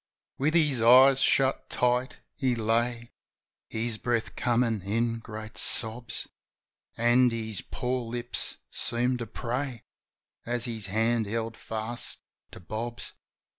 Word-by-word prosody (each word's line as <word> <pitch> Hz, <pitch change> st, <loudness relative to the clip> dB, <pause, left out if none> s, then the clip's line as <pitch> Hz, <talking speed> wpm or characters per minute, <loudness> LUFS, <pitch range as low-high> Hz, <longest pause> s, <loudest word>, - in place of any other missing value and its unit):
With 155 Hz, +5 st, +2 dB
his 150 Hz, -7 st, +3 dB
eyes 130 Hz, +3 st, +8 dB
shut 135 Hz, 0 st, +2 dB
tight 125 Hz, +1 st, +1 dB, 0.2 s
he 130 Hz, -4 st, 0 dB
lay. 115 Hz, +1 st, 0 dB, 0.6 s
His 115 Hz, -1 st, -2 dB
breath 120 Hz, -2 st, -1 dB
comin' 115 Hz, -3 st, +1 dB
in 115 Hz, +4 st, 0 dB
great 110 Hz, -1 st, -8 dB
sobs. 115 Hz, +1 st, -1 dB, 0.7 s
An' 120 Hz, +2 st, +5 dB
his 110 Hz, -4 st, -3 dB
poor 125 Hz, 0 st, -2 dB
lips 120 Hz, +1 st, -4 dB
seemed 125 Hz, +1 st, 0 dB
to 115 Hz, -, -4 dB
pray. 125 Hz, +2 st, -3 dB, 0.6 s
As 120 Hz, 0 st, -2 dB
his 110 Hz, -5 st, -4 dB
hand 110 Hz, +2 st, +1 dB
held 115 Hz, +1 st, -2 dB
fast 110 Hz, +2 st, -5 dB, 0.3 s
to -, -, -11 dB
Bob's. 115 Hz, +6 st, -5 dB
120 Hz, 120 wpm, -28 LUFS, 110-125 Hz, 0.7 s, eyes